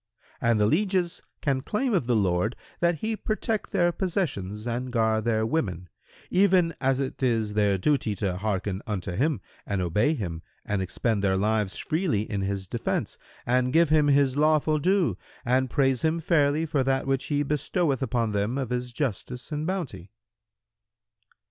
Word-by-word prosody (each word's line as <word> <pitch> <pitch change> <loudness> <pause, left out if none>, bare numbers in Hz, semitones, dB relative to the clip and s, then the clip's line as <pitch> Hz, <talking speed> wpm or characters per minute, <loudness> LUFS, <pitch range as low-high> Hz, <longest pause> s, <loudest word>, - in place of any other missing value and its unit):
And 115 -2 +3
the 105 - +4
lieges 180 - +1 0.2
can 135 -3 0
claim 240 - -1
of 170 - +1
the 120 - +2
lord 95 +2 +1 0.2
that 170 -2 +1
he 220 0 -1
protect 215 0 -2
their 175 0 +3
possessions 130 - -2
and 125 +2 -3
guard 110 -2 +1
their 110 -1 +1
women,[FN#111] 90 - -4
even 180 -3 +4
as 135 -1 +2
it 135 0 -3
is 115 -5 +1
their 105 -2 +2
duty 120 -1 +1
to 95 -3 -2
hearken 100 -1 -2
unto 95 -4 -3
him 140 - 0 0.2
and 100 -1 -2
obey 105 - +2
him 85 - -4 0.2
and 105 -2 -1
expend 100 +3 -1
their 95 -1 +2
lives 105 -1 0
freely 155 - 0
in 100 -2 -3
his 95 -1 -3
defence - - -2 0.3
and 125 +1 +1
give 165 -1 +5
him 155 -1 +4
his 140 -2 +3
lawful 155 +1 +3
due 185 +2 +1 0.3
and 130 +2 +2
praise 135 -1 +2
him 160 +1 +1
fairly 155 -2 +2
for 150 -4 0
that 135 0 0
which 135 0 0
he 145 -1 0
bestoweth 150 0 0
upon 115 -3 0
them 105 +5 -1
of 130 -3 -3
his 125 0 -2
justice 125 - -4
and 150 +1 -2
bounty." 140 - -4
130 Hz, 165 wpm, -26 LUFS, 105-155 Hz, 0.3 s, give